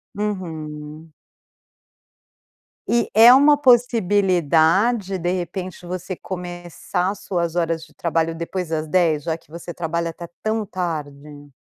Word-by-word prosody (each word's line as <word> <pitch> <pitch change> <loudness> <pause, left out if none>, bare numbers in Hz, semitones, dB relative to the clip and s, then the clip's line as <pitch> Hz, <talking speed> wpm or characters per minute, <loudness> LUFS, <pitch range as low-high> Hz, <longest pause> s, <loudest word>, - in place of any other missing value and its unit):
Uhum. 160 -6 -5 1.7
E 235 -1 +1
é 225 +3 +9
uma 290 +2 +6
possibilidade, 200 - +3
de 175 +1 -1
repente, 185 0 -5
você 180 +1 -5
começar 175 +1 -4
suas 170 -4 -3
horas 165 -1 0
de 155 - -23
trabalho 165 -1 -1
depois 170 +1 -4
das 160 -1 -2
10h, 160 -3 +2
já 160 0 -2
que 160 - -27
você 170 +1 -8
trabalha 170 0 -2
até 170 +1 -8 0.2
tão 220 0 -1
tarde? 150 -6 -6
175 Hz, 120 wpm, -21 LUFS, 160-195 Hz, 1.7 s, é